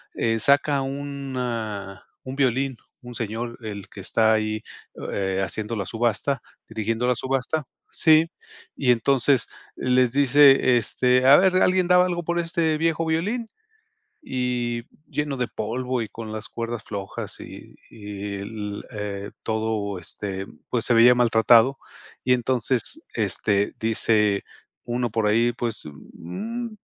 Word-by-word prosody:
Eh, 115 0 0
saca 140 +3 +3
una 125 -8 -4 0.2
un 130 +1 -6
violín, 135 -1 +1 0.2
un 125 -1 -10
señor, 115 +1 -4
el 105 -3 -7
que - - -11
está 110 +3 +2
ahí, 110 0 -1 0.3
o - - -6
eh, 95 -1 -1
haciendo 105 +5 -3
la 100 -3 -3
subasta 120 +3 -1 0.3
dirigiendo 115 +2 -1
la 125 - +3
subasta, 135 +4 -1 0.3
¿sí? 160 +1 +4 0.5
Y 130 -3 +3
entonces 130 +2 +2 0.3
les 125 -1 +2
dice: 135 -2 +6
"Este, 125 +2 +2
a 140 - +10
ver, 185 0 +4
¿alguien 185 -1 +3
daba 180 0 +6
algo, 175 -1 -2
por 170 +1 -1
este 165 -2 0
viejo 165 +1 0
violín?". 205 +9 -1 0.7
Y 120 - -2 0.2
lleno 150 -2 -2
de 125 -1 -1
polvo, 125 +3 -2
y 110 - -5
con 110 0 -8
las 110 -1 -6
cuerdas 115 -1 -4
flojas, 100 -2 -6
y - - -11
y 105 -1 -6
el, 105 0 -6
eh, 100 -3 -5
todo, 110 -3 -2
este, 95 +2 -5 0.2
pues, 120 -2 0
se 120 - +3
veía 120 +2 +7
maltratado. 120 +2 +5 0.5
Y 125 - +3
entonces, 125 - 0
este, 100 -1 0
dice 105 -2 +2 0.4
uno 120 0 -1
por 110 0 0
ahí: 115 +3 +3
"Pues, 120 -2 -4
mm, 205 - -7
120 Hz, 140 wpm, -24 LUFS, 110-135 Hz, 0.7 s, a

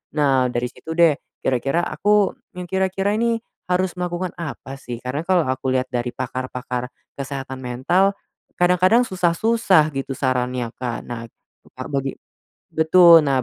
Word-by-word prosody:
Nah 135 -4 +3
dari 120 +1 -1
situ 160 - -8
deh, 165 -4 +5 0.3
kira-kira 135 +5 +1
aku 205 -1 +2 0.2
yang 180 - -5
kira-kira 190 +1 0
nih 230 0 +1 0.3
harus 180 0 +1
melakukan 180 0 -2
apa 135 -4 -6
sih, 120 -3 -6
karena 130 +4 -2
kalo 185 -3 +4
aku 130 0 -2
lihat 130 0 +1
dari 125 -1 -1
pakar-pakar 125 0 -4 0.3
kesehatan 135 -1 -5
mental, 155 +11 +1 0.4
kadang-kadang 180 +6 +4
susah-susah 185 -3 +2
gitu 135 0 -3
sarannya 125 -2 -1
Kak. 125 -2 -3
Nah, 115 -1 -7 0.5
Kak - - -6
bagi 135 -1 -2 0.6
betul. 165 +1 +7
Nah 135 -2 +2
145 Hz, 140 wpm, -21 LUFS, 130-180 Hz, 0.6 s, betul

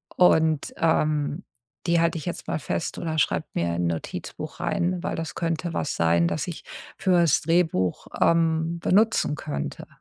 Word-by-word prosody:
Und, 160 -4 +3
ähm, 155 0 +1 0.4
die 170 0 +4
halte 170 0 +1
ich 155 - -7
jetzt 175 - -5
mal - - -1
fest 160 - -3
oder 160 -2 -3
schreibe 155 - +1
mir 85 0 0
in 85 0 +1
Notizbuch 85 -1 -5
rein, 180 0 0
weil - - -2
das 165 -1 -4
könnte 165 0 -2
was - - -2
sein, 85 0 +3
das 85 -1 -2
ich - - -6 0.3
fürs 175 -5 +3
Drehbuch, 160 - +1
ähm, 165 0 +2
benutzen 210 -6 +3
könnte.“ 70 - -5
160 Hz, 155 wpm, -25 LUFS, 140-170 Hz, 0.4 s, die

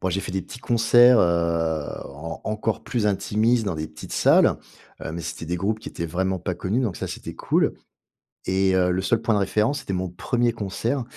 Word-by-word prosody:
bon, 95 - 0
j'ai 95 - -1
fait 90 - -6
des 95 - -1
petits - - -10
concerts, 120 +1 +5
heu, 85 -2 +1 0.3
en 80 +4 -7
encore 110 +1 -2
plus 115 -4 -1
intimistes, 110 +4 +1
dans 95 -5 -2
des 80 0 -4
petites - - -10
salles. - - +4 0.5
Heu, 80 - -4
mais 85 - -4
c'était 80 - -6
des 85 +2 -2
groupes 105 +5 -1
qui - - -7
étaient 85 - -4
vraiment 95 +3 -1
pas 90 +1 -3
connus. 95 +7 -1
Donc 110 -8 -2
ça, - - -4
c'était - - -7
cool. - - +1 0.7
Et 95 0 +2
heu, 90 -1 +3
le 90 +1 0
seul 110 +4 +1
point 115 -1 +1
de 105 - +2
référence, 110 +7 +1
c'était 95 - -5
mon 95 0 -2
1er 120 +6 0
concert, 115 +5 -2
95 Hz, 215 wpm, -24 LUFS, 90-115 Hz, 0.7 s, concerts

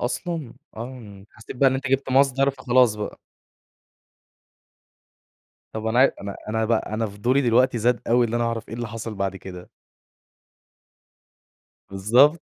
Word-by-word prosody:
أصلًا؟ 155 +1 -3 0.2
آه، 110 -5 -9
حسّيت 110 +4 -11
بقى 135 +2 +5
إن 130 - -1
أنت 135 +1 -3
جِبت 135 0 0
مصدر 135 +1 +3
فخلاص 130 -3 +2
بقى. 105 -1 -6 2.5
طب 110 0 -5
أنا 110 +2 +1
عا 135 - +6
أنا 100 0 -6
أنا 110 +1 0
بقى 110 -1 -1
أنا 110 +1 -1
فضولي 110 +7 0
دلوقتي 125 0 +3
زاد 120 +2 +1
اوي 120 +1 +4
اللي 115 +1 -2
أنا 120 - 0
أعرف 115 -1 -3
إيه - - -7
اللي 120 -1 -5
حصل 115 0 -6
بعد 95 -1 -3
كده؟ 90 -1 -10 2.2
بالضبط. 120 - +4
120 Hz, 145 wpm, -23 LUFS, 110-130 Hz, 2.5 s, عا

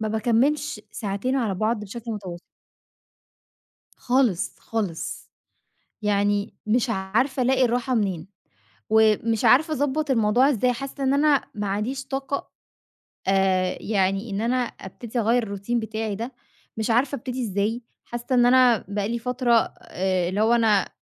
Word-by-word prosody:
ما 220 - -1
باكمِّلش 240 +4 +1
ساعتين 210 +6 -2
على 225 -7 0
بعض، 215 +4 0
بشكل 230 +3 -7
متواصل. 185 -5 -7 1.6
خالص، 245 -8 +1
خالص 205 -8 -4 0.7
يعني 205 0 +1
مش 235 +2 +1
عارفة، 225 +7 0
ألاقي 260 +1 +3
الراحة 245 +1 0
منين 190 -6 -1 0.6
ومش 220 +1 +3
عارفة 295 +8 +5
أضبّط 290 0 0
الموضوع 240 +3 +3
إزاي؟ 250 -1 +2
حاسّة 275 +3 -6
إن 270 +1 +2
أنا 290 -1 +4
ما 205 -1 -3
عنديش 235 +7 -2
طاقة 270 +1 -3 0.8
آآ 190 -1 +2
يعني 195 +1 0
إن 200 +1 -2
أنا 240 +2 +1
أبتدي 235 0 -5
أغيّر 230 +2 +2
الroutine 220 +5 -3
بتاعي 220 -1 -3
ده، 230 +5 -5 0.5
مش 220 - -2
عارفة 255 +5 +2
أبتدي 255 0 -4
إزاي 210 +3 -1 0.2
حاسّة 240 0 -6
إن 245 -1 +5
أنا 245 -3 +5
بقى 200 0 -2
لي 235 0 -2
فترة 250 0 0 0.3
آآ 185 -1 -1
اللي 200 +3 -1
هو، 225 +2 +4
أنا 220 -4 +3
225 Hz, 140 wpm, -24 LUFS, 205-255 Hz, 1.6 s, عارفة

